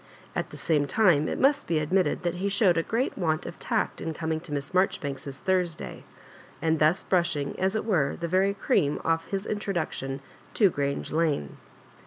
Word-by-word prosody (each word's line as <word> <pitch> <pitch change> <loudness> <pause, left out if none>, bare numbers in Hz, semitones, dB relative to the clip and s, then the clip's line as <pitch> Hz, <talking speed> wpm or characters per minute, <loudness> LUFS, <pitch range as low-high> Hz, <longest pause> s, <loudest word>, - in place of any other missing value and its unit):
At - - -2
the - - -10
same 150 -3 +1
time, 165 -4 +3
it - - -3
must 275 +2 +3
be 165 - +1
admitted 180 +6 +1
that 175 -1 0
be 200 +2 0
showed 200 -3 +4
a 165 - +2
great 230 +9 -1
want 155 -3 0
of - - -8
tact - - -1
in 160 -1 -3
coming 160 0 -2
to 160 - -11
Miss 140 -1 -3
Maijoribanks's 140 -7 -1
Thursday, 180 -3 -1 0.5
and 160 -1 +1
thus 155 +5 +3
brushing, 170 -6 +1
as 190 +2 +1
it 220 - -1
were, 160 -11 +1
the 170 - -2
very 190 +3 +2
cream 145 -6 +1
off 165 0 +1
his 195 0 -3
introduction 170 -10 -2 0.4
to 200 -6 +4
Orange 140 0 -2
Lane. 155 - 0
165 Hz, 185 wpm, -27 LUFS, 150-190 Hz, 0.5 s, showed